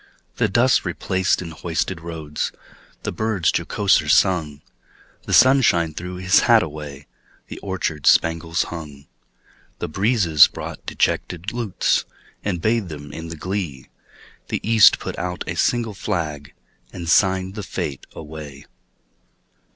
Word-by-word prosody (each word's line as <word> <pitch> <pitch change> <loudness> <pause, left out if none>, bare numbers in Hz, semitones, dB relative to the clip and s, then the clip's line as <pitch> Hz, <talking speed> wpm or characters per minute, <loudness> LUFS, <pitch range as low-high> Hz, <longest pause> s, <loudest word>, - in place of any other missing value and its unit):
The - - +2
dust - - +3
replaced 95 0 0
in 85 - -7
hoisted 80 +1 -3
roads, 80 -3 -4 0.5
The - - -2
birds 110 -6 0
jocoser 85 -2 +1
sung; 80 -5 +2 0.7
The - - -4
sunshine 120 - +5
threw 90 +3 -6
his 95 +1 +3
hat 115 -2 +6
away, 75 -2 -8 0.4
The - - -7
orchards 90 -7 0
spangles 80 +1 +2
hung. 75 -4 -9 0.7
The - - -4
breezes 95 - +4
brought - - -8
dejected 90 +4 -1
lutes, 115 -6 0 0.4
And 90 -5 -2
bathed 110 -4 +1
them 75 -2 -9
in 80 +1 -7
the 80 0 -7
glee; 85 -6 -4 0.6
The - - -2
East 110 -2 +7
put - - -6
out 90 0 -3
a - - -3
single 115 -3 0
flag, 75 -6 -4 0.4
And 85 -2 -7
signed 95 +2 +2
the 105 - -5
fete 70 -8 -5
away. 75 -3 -9
85 Hz, 130 wpm, -21 LUFS, 75-95 Hz, 0.7 s, East